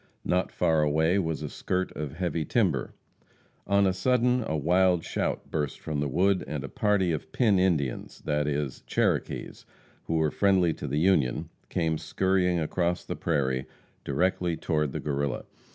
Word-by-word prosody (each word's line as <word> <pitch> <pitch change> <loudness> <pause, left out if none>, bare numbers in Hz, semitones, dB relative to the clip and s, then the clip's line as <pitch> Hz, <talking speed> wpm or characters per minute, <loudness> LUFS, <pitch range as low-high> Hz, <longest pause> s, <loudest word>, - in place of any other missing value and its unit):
Not 90 +1 +1
far 80 -1 +2
away 80 +5 +2
was 80 -4 -2
a - - -2
skirt 95 +5 -2
of 75 -2 -4
heavy 85 -2 -1
timber. - - 0 0.7
On 100 0 +4
a 95 - +2
sudden, 125 +4 +2
a 80 - -1
wild 90 +3 +3
shout - - -3
burst 75 -3 -2
from 75 -2 -3
the 70 - 0
wood, 95 +6 +2
and 75 -3 -4
a 70 - -6
party 100 -2 +1
of 80 - -4
Pin 105 -7 +3
Indians 80 -9 0
that 75 -1 0
is, 70 -3 -2
Cherokees, - - -1 0.4
who 80 - -1
were 80 -2 +2
friendly 95 -4 +3
to 75 - -6
the 70 +2 -1
Union, 75 -7 +2 0.2
came 80 -2 0
skurrying 90 +2 +1
across 85 +2 -1
the - - -4
prairie, 65 -5 -1 0.4
directly 90 +3 0
toward 75 -3 0
the - - -4
Guerrilla. 70 -1 -2
80 Hz, 165 wpm, -27 LUFS, 75-95 Hz, 0.7 s, On